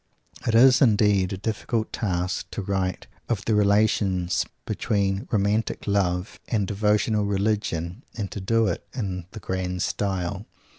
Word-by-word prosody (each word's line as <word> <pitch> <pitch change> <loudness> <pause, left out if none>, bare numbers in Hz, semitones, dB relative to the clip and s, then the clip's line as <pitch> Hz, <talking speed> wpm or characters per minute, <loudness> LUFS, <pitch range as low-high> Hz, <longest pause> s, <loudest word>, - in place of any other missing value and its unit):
It 115 - +2
is 130 +3 +7
indeed 105 -6 +4
a 95 - -3
difficult 110 +2 -2
task 90 -4 -2
to 105 - -5
write 95 -1 -1 0.2
of 110 -5 -1
the 110 - +2
relations 100 -3 +2 0.2
between 100 -3 -1
romantic 105 +1 0
love 95 -2 0
and 105 -4 0
devotional 105 +1 +1
religion 100 -4 -1
and 100 -3 -3
to 100 - -5
do 115 +4 +2
it 95 -5 -1
in 95 -8 -3
the 110 - -7
grand 90 -2 -2
style. 95 +1 -2
100 Hz, 140 wpm, -25 LUFS, 95-110 Hz, 0.2 s, is